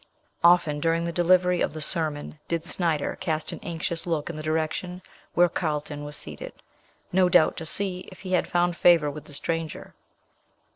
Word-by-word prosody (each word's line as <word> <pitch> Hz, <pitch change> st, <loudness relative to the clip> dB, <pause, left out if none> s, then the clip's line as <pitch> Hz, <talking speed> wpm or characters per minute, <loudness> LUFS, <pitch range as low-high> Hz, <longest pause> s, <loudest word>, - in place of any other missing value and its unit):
Often 170 Hz, -4 st, +5 dB
during 165 Hz, +2 st, +1 dB
the 170 Hz, -, -2 dB
delivery 180 Hz, +1 st, +3 dB
of -, -, 0 dB
the 155 Hz, -, -6 dB
sermon 150 Hz, -1 st, 0 dB
did 165 Hz, -1 st, -2 dB
Snyder 165 Hz, -5 st, -1 dB
cast 160 Hz, -4 st, -1 dB
an -, -, -7 dB
anxious 170 Hz, -2 st, -3 dB
look 165 Hz, -1 st, -1 dB
in -, -, -10 dB
the 155 Hz, -, -5 dB
direction 160 Hz, +4 st, -2 dB, 0.3 s
where 175 Hz, 0 st, +6 dB
Carlton 150 Hz, -3 st, -3 dB
was 145 Hz, 0 st, -5 dB
seated; -, -, -7 dB, 0.6 s
no 185 Hz, 0 st, +4 dB
doubt 175 Hz, -3 st, +4 dB
to 160 Hz, -, -4 dB
see 185 Hz, 0 st, -2 dB
if 185 Hz, -, -13 dB
he 185 Hz, -, -6 dB
had 180 Hz, -, +2 dB
found 175 Hz, 0 st, +1 dB
favour 165 Hz, -4 st, +4 dB
with 150 Hz, +1 st, -9 dB
the 150 Hz, -, -8 dB
stranger. 165 Hz, +2 st, -4 dB
165 Hz, 180 wpm, -26 LUFS, 155-175 Hz, 0.6 s, where